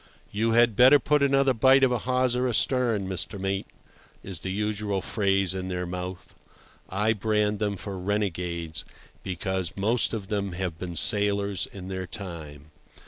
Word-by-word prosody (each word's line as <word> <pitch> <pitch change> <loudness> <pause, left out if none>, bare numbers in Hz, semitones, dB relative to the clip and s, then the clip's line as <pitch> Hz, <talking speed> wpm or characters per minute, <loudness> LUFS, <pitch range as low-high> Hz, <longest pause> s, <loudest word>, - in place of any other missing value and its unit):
"You 115 +2 0
had 120 -1 +4
better 130 +5 +8
put 145 +2 +1
another 135 -1 +3
bight 130 +3 +5
of 130 - +4
a 125 - 0
hawser 125 0 +1
astern, 120 -3 +2
Mr. 95 +2 -3
Mate," 95 0 -2 0.6
is 95 -4 -6
the 95 - -5
usual 105 0 -1
phrase 95 -2 +1
in 95 -1 -4
their 90 -1 -3
mouth. 90 +1 -6 0.6
I 105 +4 +1
brand 105 -1 0
them 105 -2 -1
for 95 0 -6
renegades, 90 -4 -2 0.4
because 95 -1 -3
most 110 +5 +1
of 100 -4 -5
them 100 -3 -2
have 85 -2 -4
been 90 -2 -5
sailors 100 +1 +2
in 95 -2 -10
their 95 -1 -4
time. 80 -5 -8
100 Hz, 155 wpm, -26 LUFS, 95-115 Hz, 0.6 s, better